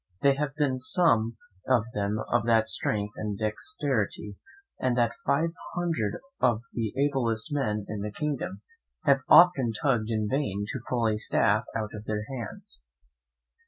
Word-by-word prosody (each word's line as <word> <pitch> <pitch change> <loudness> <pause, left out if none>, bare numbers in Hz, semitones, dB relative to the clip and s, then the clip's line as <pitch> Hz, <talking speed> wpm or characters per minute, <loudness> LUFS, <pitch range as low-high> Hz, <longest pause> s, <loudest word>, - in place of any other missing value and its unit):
There 140 0 +6
have 145 -1 -2
been 140 -4 +1
some 125 -5 +2 0.3
of 125 -4 +4
them 100 +1 -1
of 120 -2 +3
that 110 -1 +4
strength 105 -2 -1
and 105 -2 -3
dexterity 110 - -2 0.4
that 120 -2 +2 0.2
five 155 +5 +2 0.2
hundred 165 - -1 0.2
of 120 -3 +2
the 115 -3 -2
ablest 135 -2 0
men 105 -8 -1
in 105 -1 -4
the 105 +1 -4
kingdom 150 - -3 0.4
have 140 -1 +4
often 140 -10 +7
tugged 115 -2 0
in 110 -2 0
vain 105 -6 -1
to 130 - -3
pull 120 -2 +1
a 105 -1 0
staff 110 0 +2
out 110 -1 -2
of 105 0 -8
their 105 -1 -2
hands. 115 - -8
115 Hz, 150 wpm, -28 LUFS, 105-140 Hz, 0.4 s, often